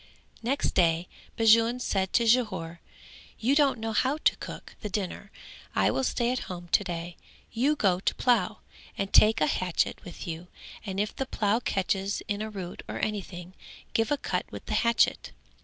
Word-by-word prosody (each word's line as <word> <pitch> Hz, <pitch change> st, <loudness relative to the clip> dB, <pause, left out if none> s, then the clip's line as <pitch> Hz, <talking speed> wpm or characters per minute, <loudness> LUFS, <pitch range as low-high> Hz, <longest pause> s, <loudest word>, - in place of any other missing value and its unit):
Next 255 Hz, +5 st, 0 dB
day 170 Hz, -1 st, +2 dB, 0.3 s
Bajun 230 Hz, +2 st, +5 dB
said 190 Hz, -6 st, -1 dB
to 235 Hz, -, +4 dB
Jhore, 210 Hz, -9 st, +1 dB, 0.6 s
"You 255 Hz, +5 st, +2 dB
don't 285 Hz, -3 st, +4 dB
know 225 Hz, 0 st, -3 dB
how 260 Hz, +7 st, +2 dB
to -, -, +3 dB
cook -, -, -8 dB
the 210 Hz, -, -4 dB
dinner; 200 Hz, 0 st, -4 dB, 0.5 s
I -, -, +3 dB
will 265 Hz, -, -1 dB
stay 240 Hz, -1 st, +1 dB
at 255 Hz, -, -1 dB
home 175 Hz, -1 st, -7 dB
to 205 Hz, -, +4 dB
day, 175 Hz, -1 st, -5 dB, 0.3 s
you 265 Hz, +6 st, +2 dB
go 190 Hz, -9 st, +2 dB
to -, -, 0 dB
plough, 220 Hz, -4 st, +1 dB, 0.4 s
and 195 Hz, 0 st, -3 dB
take 215 Hz, -5 st, +6 dB
a -, -, +5 dB
hatchet 180 Hz, +2 st, 0 dB
with 175 Hz, -, -9 dB
you 170 Hz, +1 st, -5 dB, 0.4 s
and 195 Hz, -2 st, -4 dB
if 210 Hz, +1 st, -1 dB
the 265 Hz, -, -3 dB
plough 210 Hz, -1 st, +1 dB
catches 195 Hz, -2 st, -1 dB
in 205 Hz, 0 st, -2 dB
a 215 Hz, -, -3 dB
root 190 Hz, -4 st, -7 dB
or -, -, -5 dB
anything, 185 Hz, -4 st, -4 dB, 0.4 s
give 225 Hz, -1 st, +1 dB
a 290 Hz, -, +3 dB
cut -, -, -3 dB
with -, -, -8 dB
the -, -, -3 dB
hatchet." 235 Hz, -1 st, +2 dB
210 Hz, 180 wpm, -28 LUFS, 180-235 Hz, 0.6 s, take